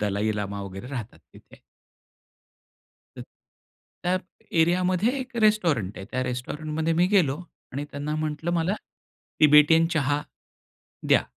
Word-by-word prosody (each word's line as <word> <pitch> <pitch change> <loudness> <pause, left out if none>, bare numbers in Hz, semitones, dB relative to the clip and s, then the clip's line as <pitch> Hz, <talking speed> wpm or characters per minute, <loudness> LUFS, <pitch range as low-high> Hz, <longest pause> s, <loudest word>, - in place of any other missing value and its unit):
Dalai 105 +1 0
llama 100 -1 -3
वगैरे 95 +3 -8
राहतात 125 -5 -6
तिथे. - - -17 1.6
तर - - -6 0.8
त्यात 180 +1 +1 0.4
एरियामध्ये 185 +8 +2
एक 260 -1 -7
रेस्टॉरंट 165 - +2
आहे. 95 - -7
त्या 130 0 -1
रेस्टॉरंट 125 +5 -4
मध्ये 160 +1 +1
मी 175 +2 +4
गेलो 175 -8 +2 0.3
आणि 140 +3 -3
त्यांना 145 +2 -4
म्हंटलं 155 +1 -2
"मला 175 +3 +1 0.7
तिबेटियन 150 +2 +7
चहा 145 -1 +1 0.9
द्या." - - +5
150 Hz, 120 wpm, -25 LUFS, 125-175 Hz, 1.6 s, तिबेटियन